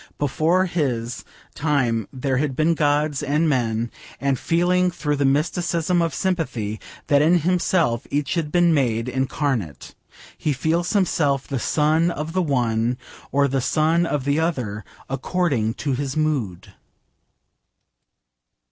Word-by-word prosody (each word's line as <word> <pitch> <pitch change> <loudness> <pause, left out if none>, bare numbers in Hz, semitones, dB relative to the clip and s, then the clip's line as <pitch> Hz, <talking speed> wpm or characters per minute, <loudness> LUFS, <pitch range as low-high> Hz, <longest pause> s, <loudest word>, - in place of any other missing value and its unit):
Before 160 +6 +2
his 125 -9 -2 0.3
time 130 -8 0
there 130 0 -1
had 140 -1 -1
been 155 +4 +2
gods 150 -2 +1
and 150 +3 +1
men, 115 -4 0 0.3
and, 140 -2 0
feeling 180 +2 +2
through 150 -4 -2
the 140 - +1
mysticism 170 +4 +1
of 165 -2 -1
sympathy 130 - -2 0.3
that 145 -1 +4
in 165 +4 +5
himself 170 -7 +1
each 145 -1 -1
had 165 -4 -2
been 175 -1 +4
made 120 -5 +1
incarnate, 130 - -2 0.4
he 150 -3 -1
calls 170 - 0
himself 150 -9 +1
the 135 - -2
Son 155 +6 +2
of 155 -1 -4
the 185 - +1
one 120 -5 0 0.3
or 140 0 +3
the 135 0 0
Son 160 +5 +2
of 145 -4 -2
the 145 +2 +1
other, 125 -11 -2 0.2
according 135 -5 -1
to 140 -3 -2
his 135 +2 -3
mood. 140 - -2
145 Hz, 135 wpm, -22 LUFS, 130-165 Hz, 0.4 s, in